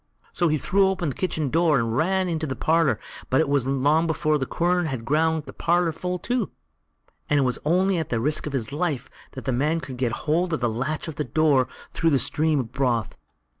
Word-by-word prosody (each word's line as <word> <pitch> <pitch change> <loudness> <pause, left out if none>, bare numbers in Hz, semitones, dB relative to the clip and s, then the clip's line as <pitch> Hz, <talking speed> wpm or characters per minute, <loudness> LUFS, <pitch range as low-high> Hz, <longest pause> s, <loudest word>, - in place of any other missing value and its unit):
So 175 - +1
he 155 -1 +2
threw 195 +5 +2
open 185 -5 -1
the 135 - -5
kitchen 160 -7 -1
door 165 -2 +3
and 115 -2 0
ran 185 +5 +1
into 160 -2 -2
the 130 - -3
parlour, 160 -7 +2 0.3
but 130 - +3
it 160 - +2
wasn't 135 -1 0
long 155 +3 +3
before 155 -1 +1
the 130 - -2
quern 175 0 +1
had 130 -6 -4
ground 160 +3 +1
the - - -10
parlour 170 0 +1
full 180 +3 -3
too, 245 +2 -1 0.8
and 150 - +3
it 140 - +3
was 125 -1 0
only 185 +3 +2
at 160 - -3
the 115 - 0
risk 150 +6 -1
of 145 - -5
his 125 -2 -2
life 150 -4 -2 0.2
that 130 - -8
the 130 - 0
man 150 +6 +1
could 130 -5 -8
get 125 -2 0
hold 170 +3 +1
of 160 - 0
the 120 - +1
latch 140 +8 -3
of 160 - -7
the 150 - 0
house 125 - -15
door 145 -5 +3 0.3
through 165 - +2
the 140 - +3
stream 155 +2 +1
of 115 - -9
broth. 120 -5 0
155 Hz, 235 wpm, -24 LUFS, 135-170 Hz, 0.8 s, door